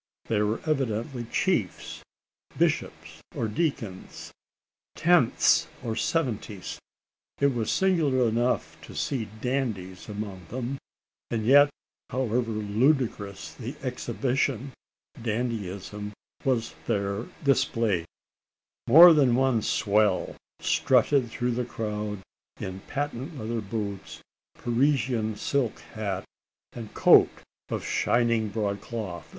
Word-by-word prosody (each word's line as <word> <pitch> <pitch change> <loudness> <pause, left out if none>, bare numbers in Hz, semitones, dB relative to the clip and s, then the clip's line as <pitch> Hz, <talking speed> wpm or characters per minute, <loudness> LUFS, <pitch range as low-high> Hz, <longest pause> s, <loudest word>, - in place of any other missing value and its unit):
They 105 -2 +1
were 105 +2 0
evidently 125 -4 -1
chiefs - - -1 0.6
bishops - - -1
or 115 - -1
deacons 110 - -3 0.6
"tenths" 170 -7 +4 0.2
or 110 -1 -2
"seventies." 115 - -2 0.6
It 140 -1 +3
was 115 -3 -1
singular 155 -10 +2
enough 120 +3 0
to - - -11
see 130 -6 -1 0.2
dandies 110 -9 -3
among 100 -4 -6
them; 130 +2 -4 0.5
and 110 -2 -2
yet, 145 +4 +7 0.4
however 125 -2 0
ludicrous 110 -1 0
the - - -7
exhibition, 135 -1 -1 0.5
dandyism 105 -3 -3 0.3
was 120 -4 0
there 100 +2 -1 0.2
displayed! 115 - +2 0.8
More 165 +7 +10
than 135 -6 +4
one 130 -3 +2
"swell" 105 0 +1 0.3
strutted 130 0 +3
through 125 +2 -1
the 120 +1 -1
crowd 105 -3 -4 0.4
in 95 0 -5
patent 145 +1 -4
leather 115 -1 -3
boots, 100 -2 -5 0.4
Parisian 120 -3 +1
silk 125 +1 -1 0.2
hat, 100 -4 -3 0.5
and 115 -3 -8
coat - - +7 0.4
of - - -3
shining 115 -2 +1
broad 100 -2 -2
cloth! 105 -6 -6
115 Hz, 100 wpm, -27 LUFS, 105-130 Hz, 0.8 s, More